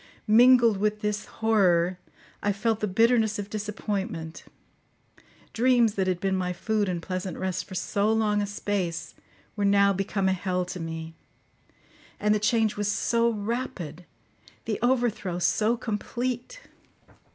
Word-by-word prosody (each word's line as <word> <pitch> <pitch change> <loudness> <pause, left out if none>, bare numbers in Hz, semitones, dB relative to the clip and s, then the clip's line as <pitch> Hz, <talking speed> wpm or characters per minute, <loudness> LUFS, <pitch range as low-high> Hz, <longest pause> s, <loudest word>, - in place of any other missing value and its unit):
Mingled 235 0 +6
with 210 +1 -1
this 210 -1 -2
horror, 185 -5 +2 0.4
I 205 - +1
felt 220 +2 0
the 215 - -1
bitterness 225 +2 +3
of 205 0 -6
disappointment; 200 -6 -4 1.1
dreams 240 -2 +3
that 190 -3 -1
had 180 -2 0
been 190 0 0
my 180 -1 -1
food 210 +2 -1
and 175 -2 -3
pleasant 185 -1 -4
rest 185 -1 -2
for 185 - -9
so 205 +3 0
long 215 -2 +1
a 205 - -2
space 200 -4 -3 0.4
were 205 - -2
now 200 0 +4
become 195 0 -1
a 190 - +3
hell 180 -1 -1
to 180 +1 -6
me; 165 0 -6 1.1
and 210 0 +2
the 215 - +1
change 215 0 +2
was 205 0 0
so 235 +2 +1
rapid, 210 - -4 0.6
the 220 -2 -2
overthrow 240 -7 0
so 215 +6 +1
complete! 245 - -4
205 Hz, 140 wpm, -26 LUFS, 185-225 Hz, 1.1 s, Mingled